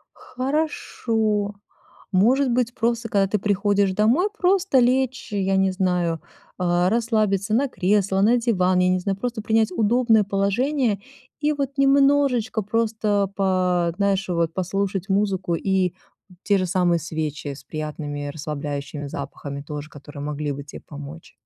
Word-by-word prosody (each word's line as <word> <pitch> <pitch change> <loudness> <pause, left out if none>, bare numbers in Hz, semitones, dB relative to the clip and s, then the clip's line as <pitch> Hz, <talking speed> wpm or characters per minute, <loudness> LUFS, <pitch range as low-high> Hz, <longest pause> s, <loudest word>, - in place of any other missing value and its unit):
Хорошо. 225 -7 -1 0.6
Может 250 +8 +3
быть, 240 0 0
просто, 235 0 -1
когда 195 -1 +3
ты 210 - 0
приходишь 200 -1 +1
домой, 235 - +3
просто 370 -6 +2
лечь, 255 -1 +1
я 195 -1 0
не 190 0 +3
знаю, 180 -3 0 0.4
э, 175 0 +2
расслабиться 215 -2 +1
на 275 +3 +2
кресло, 195 -2 +1
на 235 +4 +4
диван, 185 -6 +2
я 180 0 +3
не 185 0 +2
знаю, 195 +1 -2
просто 240 -2 -3
принять 220 0 +2
удобное 225 +1 +3
положение 205 +4 0 0.4
и 300 0 +2
вот 280 -2 -3
немножечко 275 -5 +3
просто 215 -2 0
по 180 -3 +1
знаешь, 195 -1 +1
вот 170 -2 0
послушать 195 +1 -2
музыку 195 -3 +1
и 185 0 +1 0.5
те 200 -1 +3
же 185 - 0
самые 175 -2 +2
свечи 155 -2 -4
с - - -13
приятными 150 -2 -5
расслабляющими 145 -1 -5
запахами 140 0 -6
тоже, 150 0 -7
которые 145 0 -10
могли 150 0 -3
бы 140 +1 -6
тебе 145 - -10
помочь. 145 +2 -10
200 Hz, 140 wpm, -23 LUFS, 175-230 Hz, 0.6 s, на